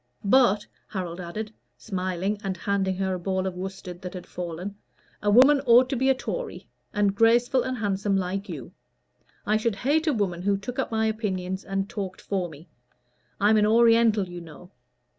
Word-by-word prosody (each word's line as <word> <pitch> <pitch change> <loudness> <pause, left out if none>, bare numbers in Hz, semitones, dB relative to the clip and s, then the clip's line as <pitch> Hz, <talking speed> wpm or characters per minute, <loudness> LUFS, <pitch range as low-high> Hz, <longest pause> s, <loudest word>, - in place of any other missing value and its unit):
But," 210 -2 +4 0.2
Harold 180 -3 -5
added, 210 +5 -6 0.2
smiling 190 +1 -2
and 190 -1 -3
handing 190 0 0
her 190 0 0
a 180 - -3
ball 190 +1 -1
of 190 - -2
worsted 185 -1 -7
which 180 0 -6
had 180 - -7
fallen, 180 +2 -6 0.5
"a 205 - +1
woman 270 +6 +6
ought 245 +2 +6
to - - +1
be 265 +2 +2
a 265 - +4
Tory, - - -5 0.2
and 205 -2 +2
graceful, 235 +4 +4
and 255 0 -3
handsome, 200 -2 0
like 195 +2 -3
you. - - -7 0.7
I 215 +1 +3
should 220 -1 0
hate 295 +10 +1
a 305 - +3
woman 190 -6 -1
who 200 +1 +1
took 245 +7 -6
up 265 - 0
my 220 -1 0
opinions 190 -4 -2
and 195 0 -2
talked 195 -5 -5
for 185 -3 -2
me. 155 +2 -13 0.7
I'm 210 +2 +4
an 210 0 +4
Oriental, 230 -2 +4
you 175 0 -8
know. 170 +3 -13
200 Hz, 180 wpm, -26 LUFS, 185-225 Hz, 0.7 s, woman